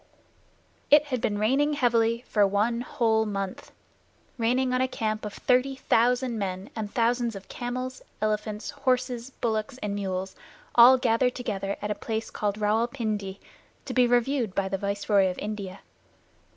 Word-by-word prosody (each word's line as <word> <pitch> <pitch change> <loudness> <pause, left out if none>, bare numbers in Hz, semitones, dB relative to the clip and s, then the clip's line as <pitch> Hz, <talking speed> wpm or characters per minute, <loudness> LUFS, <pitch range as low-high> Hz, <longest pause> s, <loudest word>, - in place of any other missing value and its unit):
It 295 0 +7
had 255 -5 -3
been 205 - 0
raining 270 +8 +2
heavily 235 -3 +2
for 205 -2 +3
one 215 +4 +1
whole 225 -3 +1
month 195 -3 -4 0.6
raining 250 +2 +1
on 255 - +2
a 260 - +2
camp 215 -3 -3
of 210 - -5
thirty 255 +2 +2
thousand 245 -1 +1
men 190 0 -4
and 215 -2 -4
thousands 235 -1 +1
of 195 0 -9
camels, 255 +1 -4 0.2
elephants, 215 0 -2
horses, 255 -2 -1
bullocks, 230 0 -2
and 210 -5 -3
mules 190 -1 -3 0.4
all 245 +2 +8
gathered 250 0 +2
together 200 -5 -3
at 210 - -1
a - - +2
place 220 +1 -4
called 205 -1 -2
Rawal 215 +3 +2
Pindi, 210 -6 -3 0.5
to - - -5
be 250 -1 +4
reviewed 245 -3 +1
by 195 -1 0
the 195 0 -2
Viceroy 200 -1 +2
of 180 - -5
India. 200 -2 -5
225 Hz, 155 wpm, -27 LUFS, 205-250 Hz, 0.6 s, all